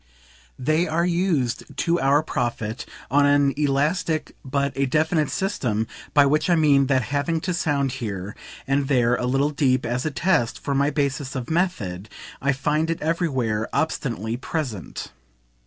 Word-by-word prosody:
They 155 +6 +1
are 165 +2 +1
used, 170 -9 -1
to 170 +1 +1
our 140 +3 +3
profit, 120 -5 -3 0.2
on 145 +1 +5
an 145 -1 +4
elastic 150 +3 0
but 140 0 -1
a 140 0 +1
definite 155 +2 +1
system; 125 - -1 0.3
by 145 -1 +7
which 150 +5 +2
I 175 - +5
mean 145 -4 +4
that 130 -2 +2
having 145 +3 0
to 180 - -2
sound 145 -6 0
here 105 -6 -5 0.3
and 135 0 +1
there 125 -4 +3
a 125 - -2
little 135 +3 +1
deep, 130 -3 +1
as 125 +2 -1
a 155 - 0
test, 155 -6 +1
for 140 - -2
my 140 +1 +2
basis 140 -1 -2
of 130 +2 -4
method, 110 - -1 0.3
I 140 - +2
find 150 +4 0
it 165 - -1
everywhere 130 -10 -1
obstinately 120 -7 -1
present. 130 - -5
140 Hz, 155 wpm, -23 LUFS, 125-155 Hz, 0.3 s, by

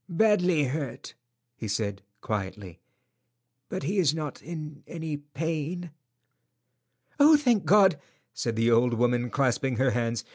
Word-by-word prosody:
"Badly 180 -4 +3
hurt," 140 +1 -4 0.4
he 115 - -6
said, 100 -1 -2 0.2
quietly, 100 -3 -5 0.9
"but - - -4
he 190 +8 0
is 160 -4 +3
not 150 -4 -5
in 155 -2 -8
any 160 -2 -5
pain." 160 +3 -4 1.3
"Oh, 300 +2 +8
thank 245 - +2
God!" 190 -2 +5 0.3
said 115 -2 -2
the 115 +1 +2
old 120 +1 +3
woman, 120 +1 +1
clasping 130 0 0
her 130 +2 +2
hands. 115 -1 -1
145 Hz, 130 wpm, -27 LUFS, 120-170 Hz, 1.3 s, Oh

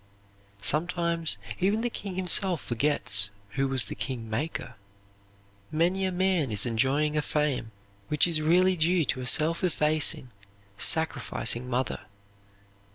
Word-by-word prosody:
Sometimes 170 - 0 0.2
even 205 +4 +1
the 240 - -1
king 195 -4 -6
himself 185 -1 +2
forgets 120 -6 +1 0.2
who 135 +6 -1
was 135 -2 +1
the - - -6
kingmaker." 125 +4 -4 1.0
Many 175 +5 +1
a 185 - -1
man 180 -5 +1
is 105 0 +4
enjoying 135 +6 +1
a 150 - +2
fame 150 -6 -1 0.4
which 150 - +2
is 165 -3 +1
really 180 +4 +3
due 170 0 +2
to 130 - -2
a 125 - -4
self 160 +7 +1
effacing, 150 -6 +1 0.4
sacrificing 125 -2 +1
mother. 130 +1 -1
155 Hz, 125 wpm, -27 LUFS, 130-175 Hz, 1.0 s, is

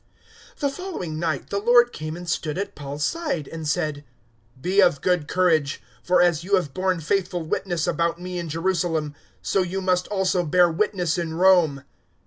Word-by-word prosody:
023:011 - - -31
The 285 - +2
following 275 - -5
night 160 -4 -2
the 200 - 0
Lord 240 +2 +4
came 155 +1 -5
and 175 0 -9
stood 160 -2 -2
at 200 +1 -3
Paul's 145 +1 -4
side, 305 - -2
and 160 -1 -6
said, 150 -2 -1 0.6
"Be 185 +8 +2
of 145 -7 +4
good 180 -5 0
courage, 160 -5 +1 0.2
for 180 0 +3
as 170 -2 +2
you 200 +3 +2
have 155 -8 -1
borne 185 0 0
faithful 175 +1 -1
witness 170 +1 -2
about 170 0 0
me 180 0 -5
in 170 -2 -5
Jerusalem, 165 -2 -1 0.3
so 195 - +1
you 185 +1 -2
must 185 -1 0
also 190 -3 +1
bear 175 +2 +4
witness 180 -2 0
in 165 -2 -3
Rome." 170 -6 +4
175 Hz, 180 wpm, -24 LUFS, 160-190 Hz, 0.6 s, Lord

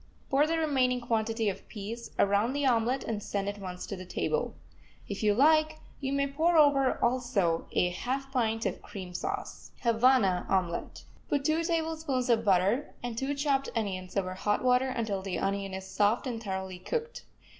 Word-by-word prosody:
Pour 285 +3 +4
the 330 +1 0
remaining 260 -6 +2
quantity 225 -2 0
of 195 - -3
peas 225 +2 -6
around 205 +5 +3
the 285 0 0
omelet, 245 +1 +2
and 215 -2 -3
send 200 -1 -3
at 205 0 -4
once 180 -2 -6
to 200 - -5
the 185 - -8
table. 470 - -2 0.5
If 200 - -5
you 210 -2 +3
like, 310 +4 +4 0.2
you 270 -1 -2
may 280 0 +2
pour 320 +5 +2
over, 280 -3 +5
also, 235 -9 +1
a 180 - +3
half 265 +9 -3
pint 225 -3 0
of - - -2
cream 185 -4 -8
sauce. 395 - -5
HAVANA 230 -6 +3
OMELET 180 -3 -1 0.3
Put 280 -1 0
two 315 +2 +2
tablespoonfuls 320 -6 0
of 225 -1 +3
butter 200 +7 +2
and 240 -2 -3
two 270 +4 -1
chopped 280 -1 +1
onions 185 -4 -3
over 185 -1 -1
hot 205 +4 0
water 250 +1 +3
until 220 -6 -2
the 190 -1 -3
onion 195 0 -2
is 190 0 -6
soft 210 +6 +1
and 235 -3 -3
thoroughly 190 -3 -4
cooked. 465 - -4
235 Hz, 175 wpm, -29 LUFS, 200-275 Hz, 0.5 s, over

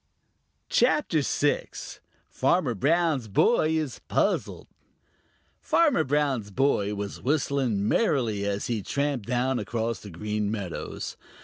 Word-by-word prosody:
CHAPTER 175 - +3
VI: 145 +1 0 0.6
Farmer 135 -1 +1
Brown's 150 - +1
Boy 155 - +3
Is 150 -5 -3
Puzzled - - 0 1.0
Farmer 295 - +3
Brown's 135 -7 0
boy 105 -3 +1
was 100 0 -5
whistling 135 -7 0
merrily 120 - +1
as 100 0 -2
he 115 -3 -1
tramped 140 +1 -2
down 125 +1 0
across 115 +2 -2
the 105 - -10
Green 105 +4 -2
Meadows. 100 -6 -5
125 Hz, 110 wpm, -26 LUFS, 105-145 Hz, 1.0 s, CHAPTER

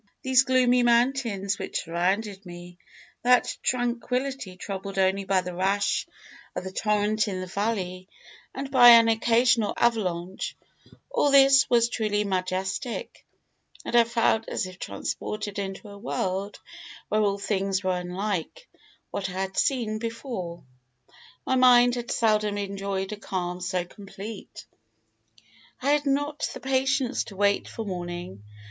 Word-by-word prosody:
Those 260 0 +5
gloomy 255 -1 +3
mountains 235 -4 +1
which - - -3
surrounded 190 +4 -1
me, 175 0 -11 0.4
that 250 0 +3
tranquillity 250 -3 -2
troubled 195 0 -6
only 190 +1 +2
by 190 -1 +2
the 180 0 -6
rash 200 +3 0 0.5
of - - -3
the 190 - -6
torrent 210 +1 +1
in 190 -2 -3
the 185 - -4
valley 185 -2 -3 0.5
and 270 0 -5
by 245 -2 +8
an 230 -1 +8
occasional 230 0 +2
avalanche, 190 -6 -1 0.5
all 480 -12 +2
this 275 0 +6
was 235 -1 +4
truly 215 -3 -1
majestic, 190 +4 -3 0.6
and - - -3
I 235 -1 +7
felt 225 -1 +1
as - - -2
if 185 0 -10
transported 210 -1 -4
into 195 +1 -5
a 200 0 -11
world 195 -2 -3 0.5
where 215 - +2
all 200 -1 +1
things 195 -1 -1
were 185 -1 0
unlike 190 - -4 0.4
what 195 -1 -3
I - - -7
had 190 +1 -3
seen 225 -5 0
before. 225 - -5 0.8
My - - 0
mind 245 -1 +6
had 240 -1 -4
seldom 215 -2 +1
enjoyed 195 -1 -3
a 210 - -5
calm 180 -3 -4
so 180 -1 -1
complete. 200 +2 -10 1.1
"I 275 +2 +1
had 295 0 +1
not 290 +2 0
the - - -6
patience 265 0 0
to 200 - -11
wait 200 +1 +1
for 225 - -6
morning. 175 - -6
205 Hz, 140 wpm, -26 LUFS, 190-240 Hz, 1.1 s, by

